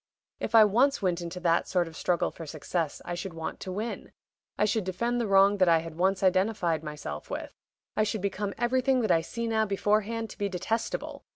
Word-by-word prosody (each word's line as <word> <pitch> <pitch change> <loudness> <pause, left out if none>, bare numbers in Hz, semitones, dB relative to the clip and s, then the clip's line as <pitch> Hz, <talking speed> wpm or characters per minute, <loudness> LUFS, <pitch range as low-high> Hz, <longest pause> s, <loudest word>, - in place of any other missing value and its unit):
If 220 - -2
I 220 -1 +9
once 250 +5 +2
went 180 -2 +1
into 170 +1 -5
that 170 -1 +2
sort 175 -2 +1
of 165 - -11
struggle 175 +1 0
for 165 - -9
success 155 +1 -3
I 175 - -4
should 175 0 -5
want 160 -1 -5
to 185 - -6
win 215 +5 -5 0.4
I 210 - +3
should 215 0 +1
defend 235 +7 -1
the 230 - -1
wrong 195 +1 +5
that 185 -2 +5
I 165 - +6
had 165 0 -5
once 190 +3 +1
identified 185 -4 +2
myself 145 - -6
with. - - -5 0.4
I - - +2
should 215 -1 0
become 200 0 -2
everything 255 +2 +2
that 220 - +1
I 165 - +4
see 235 +8 -5
now 220 -1 +1
beforehand 215 +3 0
to - - -13
be 200 -1 0
detestable. 220 +5 -3
195 Hz, 210 wpm, -28 LUFS, 170-220 Hz, 0.4 s, I